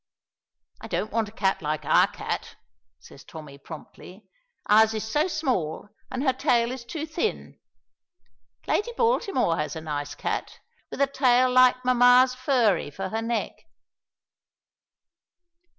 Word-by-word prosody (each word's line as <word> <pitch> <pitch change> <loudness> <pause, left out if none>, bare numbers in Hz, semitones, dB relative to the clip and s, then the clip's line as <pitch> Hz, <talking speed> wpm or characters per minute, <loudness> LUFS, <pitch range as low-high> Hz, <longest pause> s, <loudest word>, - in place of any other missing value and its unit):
"I - - -8
don't 215 - -3
want 225 -2 -1
a - - -15
cat 195 -3 -1
like 155 0 -3
our - - +4
cat," - - -6 0.4
says 140 - -15
Tommy, 150 -3 -11
promptly. 180 +6 -12 0.4
"Ours 220 +1 +5
is 215 - -3
so 295 +9 0
small, 225 - -2 0.2
and 260 +1 -4
her 265 -3 +2
tail 245 -3 +1
is 255 -2 -7
too 310 +6 -5
thin. 70 - -4 1.1
Lady 475 +3 -1
Baltimore 395 - +1
has 150 0 -3
a 160 - -6
nice 145 -2 -5
cat, - - -4 0.3
with - - -5
a - - +6
tail 255 -2 +2
like 255 0 +4
mamma's 250 +1 +5
furry 250 - +1
for 190 +6 -6
her 220 +2 -3
neck." 230 0 -2
235 Hz, 135 wpm, -25 LUFS, 165-255 Hz, 1.1 s, a